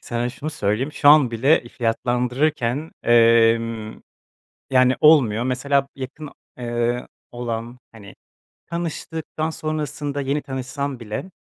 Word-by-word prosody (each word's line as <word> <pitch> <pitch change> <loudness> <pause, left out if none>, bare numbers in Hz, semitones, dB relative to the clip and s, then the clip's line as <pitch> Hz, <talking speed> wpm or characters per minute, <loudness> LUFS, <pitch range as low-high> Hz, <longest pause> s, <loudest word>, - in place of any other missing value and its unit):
Sana 120 0 -3
şunu 145 +5 -6
söyleyeyim, 115 +4 -1
şu 145 - +3
an 145 -5 +7
bile 120 +1 +2
fiyatlandırırken, 125 +4 -1
emm, 115 -1 +3 0.7
yani, 130 0 +4
olmuyor. 125 -8 +5
Mesela 135 +2 +1
b - - -23
yakın, 140 +3 -7 0.3
eee, 120 0 -2 0.3
olan, 120 0 -5
hani, 100 -3 -13 0.5
tanıştıktan 160 -1 -4
sonrasında 150 -2 -3
yeni 140 +2 -1
tanışsam 135 0 -4
bile, 115 - -6
125 Hz, 110 wpm, -22 LUFS, 115-145 Hz, 0.7 s, an